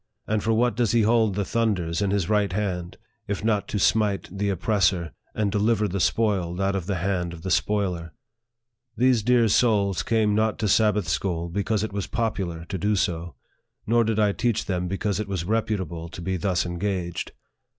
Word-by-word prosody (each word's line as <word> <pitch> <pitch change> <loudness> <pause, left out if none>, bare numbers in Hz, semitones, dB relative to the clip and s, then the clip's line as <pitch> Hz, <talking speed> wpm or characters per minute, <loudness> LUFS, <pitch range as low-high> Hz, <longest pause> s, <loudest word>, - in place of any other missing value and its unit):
and 110 -1 -1
for 115 - +1
what 115 +1 +2
does 115 -3 +1
he 115 -2 +4
hold 110 -2 +3
the 100 -1 -1
thunders 100 -7 0
in 100 - +1
his 100 -3 0
right 105 -3 +1
hand, 90 -4 -3 0.3
if 100 0 -3
not 105 -2 +1
to - - -2
smite 105 -1 +2
the 100 +1 -1
oppressor, 95 -3 +1 0.2
and 105 -2 0
deliver 105 +1 +2
the 100 0 -3
spoiled 95 -4 +1
out 100 0 +1
of 95 -2 -3
the 100 - 0
hand 90 -1 -1
of 85 -1 -10
the 95 - -3
spoiler? 90 -3 0 0.4
" 120 0 -48
These 125 -1 +3
dear 120 +1 +4
souls 100 -4 +2
came 110 -2 +1
not 110 +1 +1
to 110 - -1
Sabbath 105 -2 +3
school 85 +1 -1
because 100 +3 -1
it 110 - -4
was 100 -2 -3
popular 95 -8 -2
to 95 +2 -5
do 105 +4 +1
so, 85 -2 -2 0.5
nor 115 +2 +3
did 110 -1 -1
I 105 -1 +3
teach 115 0 -1
them 90 -2 -2
because 95 +1 -1
it 105 - -3
was 95 -4 -3
reputable 95 -6 -2
to 90 - -9
be 95 +2 -1
thus 90 +1 0
engaged. 85 -1 -3
100 Hz, 195 wpm, -25 LUFS, 90-110 Hz, 0.5 s, he